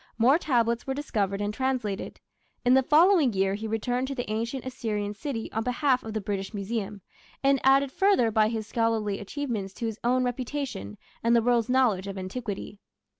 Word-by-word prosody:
More 255 +7 +5
tablets 235 -6 +1
were 265 - -1
discovered 205 -8 -1
and 205 0 -1
translated. 250 -6 -2 0.5
In 250 - +5
the 265 - +6
following 310 - +5
year 195 0 +1
he 215 +2 -4
returned 245 +4 -1
to 275 - -4
the 245 - -4
ancient 230 +4 -3
Assyrian 215 -5 -3
city 225 +1 -5
on 225 - -1
behalf 255 +1 +1
of 220 - -6
the 215 - -1
British 195 +1 -4
Museum, 205 0 -4 0.4
and 275 -1 +3
added 270 0 +4
further 385 - +3
by 215 0 +4
his 220 -1 -3
scholarly 225 -3 0
achievements 210 -4 -4
to 235 - -4
his 220 -1 -4
own 255 +2 +2
reputation 245 - -4 0.3
and 230 +1 +4
the 235 - +5
world's 240 -1 +2
knowledge 235 -7 +2
of 195 0 -5
antiquity. 205 +1 -5
230 Hz, 180 wpm, -27 LUFS, 210-260 Hz, 0.5 s, the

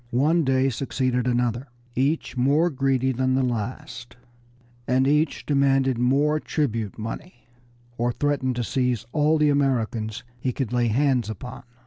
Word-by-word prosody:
One 150 +8 +2
Dey 135 0 +2
succeeded 130 0 -1
another, 120 +1 0 0.3
each 140 +5 0
more 145 +7 +2
greedy 135 -1 +1
than 130 +1 0
the 135 - +2
last, 120 0 -4 0.7
and 130 +1 +2
each 150 +2 +1
demanded 135 -3 +2
more 145 +5 +2
tribute 115 -10 -2
money 120 +7 -7 0.5
or 120 +1 +1
threatened 130 -1 -1
to 120 - -1
seize 125 -1 -1
all 155 +1 +2
the 150 -1 +3
Americans 115 -6 -1 0.2
he 125 +1 -2
could 125 -3 -3
lay 120 -1 +2
hands 125 -1 +1
upon. 120 +4 -7
130 Hz, 140 wpm, -24 LUFS, 120-140 Hz, 0.7 s, the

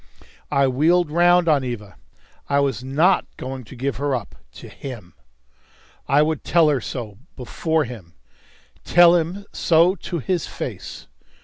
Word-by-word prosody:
I 140 -1 +2
wheeled 155 +5 +2
round 175 +1 +4
on 145 -4 +3
Eva. 105 -7 -6 0.5
I 140 - +2
was 135 -4 -1
not 160 +8 +2
going 130 0 -6
to 110 - -12
give 130 -1 -3
her 140 0 -1
up 115 -5 -6 0.2
to - - -11
him. 115 - -9 0.9
I 145 +2 +4
would 155 -2 -2
tell 165 -3 +3
her 140 -4 0
so 110 -6 -7 0.2
before 160 +5 -1
him 110 -10 -10 0.7
tell 175 0 +6
him 175 +4 -2
so 170 +2 +3
to 175 -1 -6
his 170 +3 -2
face. - - -7
140 Hz, 145 wpm, -21 LUFS, 125-170 Hz, 0.9 s, tell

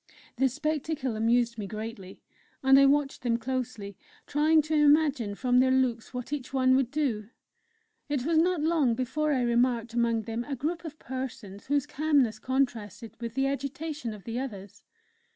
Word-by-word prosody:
The 265 +1 +3
spectacle 300 -2 -2
amused 235 +1 +1
me 200 - -4
greatly, 215 -3 -8 0.4
and 270 +1 +7
I 275 - +7
watched 280 0 +1
them 235 -2 +1
closely, 235 -6 -4 0.3
trying 310 +2 +3
to 310 +1 -3
imagine 290 -7 +3
from 250 +2 +2
their 260 0 +4
looks 255 -3 +1
what 250 +2 -5
each 270 -4 -4
one 260 -1 +3
would 265 -2 +2
do.... 250 -8 -2 0.8
It 280 -3 -1
was 325 0 +3
not 350 -1 +2
long 310 -7 +2
before 260 +5 -1
I 260 -3 +1
remarked 240 -1 +1
among 230 -1 +1
them 225 +2 -3
a 285 - -3
group 325 +7 -3
of 310 -1 -7
persons 240 -8 -7
whose 285 -1 +1
calmness 275 -7 +1
contrasted 235 -5 -2
with 230 -1 -5
the 270 - +1
agitation 280 0 -3
of 210 -3 -10
the 230 +1 -4
others. 200 -6 -7
260 Hz, 170 wpm, -28 LUFS, 230-290 Hz, 0.8 s, and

